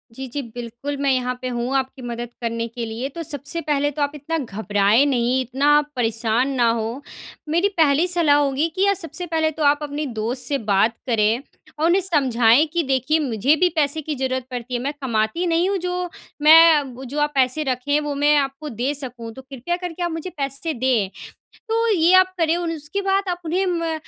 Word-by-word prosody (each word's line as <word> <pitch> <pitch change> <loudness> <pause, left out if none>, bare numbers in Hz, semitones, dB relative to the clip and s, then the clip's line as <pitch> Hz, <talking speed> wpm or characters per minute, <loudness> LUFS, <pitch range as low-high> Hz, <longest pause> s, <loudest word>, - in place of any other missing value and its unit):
जी, 265 +1 -6
जी। 280 +4 -4
बिल्कुल, 240 +3 -6
मैं 280 0 +1
यहाँ 250 -1 0
पे 255 - -3
हूँ 240 +3 -2
आपकी 265 0 -4
मदद 240 -1 -5
करने 230 0 -2
के 235 0 -6
लिए 230 +4 -4
तो 335 +4 -7
सबसे 290 +2 -4
पहले 290 -1 0
तो 295 - -5
आप 285 0 +1
इतना 310 +3 -3
घबराएँ 210 -1 +1
नहीं, 255 -2 +1
इतना 280 +4 +3
परेशान 230 +1 0
ना 240 -2 +3
हो, 230 +3 -2 0.5
मेरी 340 +5 +2
पहली 315 +1 +3
सलाह 335 -5 +4
होगी 285 +2 +1
कि 385 - +2
अ, 400 - +4
सबसे 345 -2 -5
पहले 320 -1 0
तो 310 0 -4
आप 290 0 +4
अपने 295 +1 -4
दोस्त 245 +4 -1
से 280 - +1
बात 200 +4 +3
करें 225 0 +2 0.4
और 315 - +2
उन्हें 355 +3 +3
समझाएँ 265 -6 +3
कि 345 -1 +1
देखिए 270 +3 +1
मुझे 265 0 +2
भी 360 +3 +3
पैसे 305 0 0
की 300 0 -4
ज़रूरत 260 -1 -2
पड़ती 250 0 -6
है, 245 - 0
मैं 285 +2 -2
कमाती 230 +6 0
नहीं 340 +2 +2
हूँ 400 - 0
जो 360 0 -3 0.3
मैं 310 -3 +6
जो 285 +4 -4
आप 295 0 +1
पैसे 265 +3 +2
रखें 270 +2 0
वो 295 -1 -3
मैं 295 +1 +3
आपको 275 +2 -2
दे 250 +4 -2
सकूँ 250 -5 -6
तो 265 - -10
कृपया 270 +5 -4
करके 355 -1 -5
आप 345 - -1
मुझे 325 +3 -5
पैसे 280 +1 -3
दें। 240 -6 +1 0.6
तो 455 +1 +1
ये 345 -1 +3
आप 370 0 +4
करें 325 0 +2
और 345 -1 -2
उसके 320 +5 -4
बाद 390 0 0
आप 355 0 -3
उन्हें 360 +4 0
म 335 -2 -1
285 Hz, 205 wpm, -21 LUFS, 245-325 Hz, 0.6 s, मैं